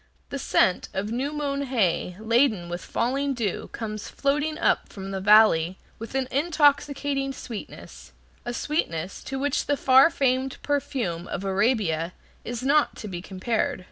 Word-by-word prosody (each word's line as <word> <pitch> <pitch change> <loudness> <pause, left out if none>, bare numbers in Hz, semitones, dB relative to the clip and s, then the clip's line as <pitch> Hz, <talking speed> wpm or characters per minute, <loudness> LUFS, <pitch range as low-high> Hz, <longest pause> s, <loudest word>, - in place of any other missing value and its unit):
The 280 - -4
scent 185 -7 +2
of 200 +3 -2
new 260 +5 -1
mown 285 -2 -2
hay 195 -9 0
laden 220 -5 +2
with 175 +1 -5
falling 275 +3 -1
dew 220 -6 -3
comes 215 -2 -5
floating 295 +2 0
up - - +1
from 195 -1 -7
the 190 -1 -3
valley 190 -4 +5 0.2
with 225 +3 -8
an 265 -1 0
intoxicating 285 -2 +1
sweetness, 235 -5 -9 0.3
a 240 - -4
sweetness 195 - -2
to 270 - -4
which 285 +1 -1
the 285 - +1
far 265 +3 +6
famed 265 -4 0
perfume 235 - -2
of 190 - -4
Arabia 190 -5 +1 0.3
is 240 0 -5
not 290 +3 +3
to 215 - -7
be 175 -3 -5
compared. 195 +4 -2
240 Hz, 150 wpm, -25 LUFS, 195-280 Hz, 0.3 s, far